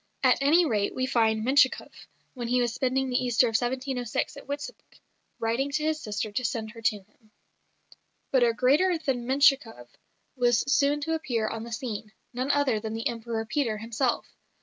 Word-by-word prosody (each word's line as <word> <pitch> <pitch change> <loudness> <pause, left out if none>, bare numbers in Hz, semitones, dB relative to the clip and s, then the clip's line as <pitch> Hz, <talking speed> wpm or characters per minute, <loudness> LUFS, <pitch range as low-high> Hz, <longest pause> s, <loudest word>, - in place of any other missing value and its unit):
At - - +4
any 320 +5 +5
rate 210 -8 0
we 255 - 0
find 225 -3 +1
Menshikoff, 265 0 +1 0.3
when 245 -3 -5
he 250 +1 +2
was 240 -2 0
spending 260 +1 0
the 250 +1 +1
Easter 245 0 +3
of 230 - 0
1706 250 +2 -2
at 280 - -12
Witebsk, 285 +1 -4 0.6
writing 230 +5 -1
to 305 +1 0
his 310 0 0
sister 210 0 -3
to 235 +5 -2
send 230 -2 -3
her 230 0 -12
to 210 -2 0
him. 215 +2 -31 1.0
But 260 - +3
a 235 - +4
greater 290 +10 +3
than 255 -6 -2
Menshikoff 265 - +2 0.5
was 240 -3 +2
soon 285 +1 +2
to 325 +2 -2
appear 240 -9 -1
on 225 0 -4
the 235 - -9
scene 220 -2 -5 0.2
none 255 +3 -2
other 285 -6 +2
than 220 +1 -5
the 225 - -1
Emperor 230 -1 -4
Peter 240 -2 -1
himself. 230 +3 -1
245 Hz, 180 wpm, -27 LUFS, 225-275 Hz, 1.0 s, any